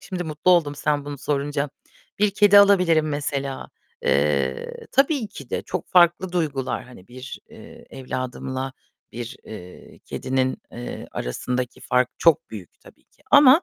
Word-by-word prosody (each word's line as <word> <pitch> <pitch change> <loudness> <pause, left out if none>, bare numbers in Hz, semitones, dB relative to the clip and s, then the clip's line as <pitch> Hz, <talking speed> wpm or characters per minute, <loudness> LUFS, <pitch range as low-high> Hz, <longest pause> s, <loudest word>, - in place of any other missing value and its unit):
şimdi 180 -3 -5
mutlu 155 +3 +1
oldum 165 -5 +4
sen 145 0 0
bunu 145 -1 -6
sorunca. 145 +1 -1 0.5
Bir 210 -1 +4
kedi 205 0 +6
alabilirim 180 -6 +5
mesela. 140 -2 -3 0.3
Eee, 70 -2 0
tabii 275 -4 +2
ki 140 -9 -11
de - - -2
çok 185 - -5
farklı 175 +1 +4
duygular. 145 -7 -1
Hani 120 -7 -15
bir, 130 +1 -9
eee, - - -14
evladımla 130 0 -4 0.4
bir, 120 0 -6
eee, 90 -4 -11
kedinin, 130 0 -1
eee, 120 +1 -7
arasındaki 125 - -3
fark 125 0 +2
çok 165 -3 +3
büyük 100 -6 -10
tabii - - -19
ki. - - -31
Ama 285 +3 +8
145 Hz, 140 wpm, -23 LUFS, 125-175 Hz, 0.5 s, Ama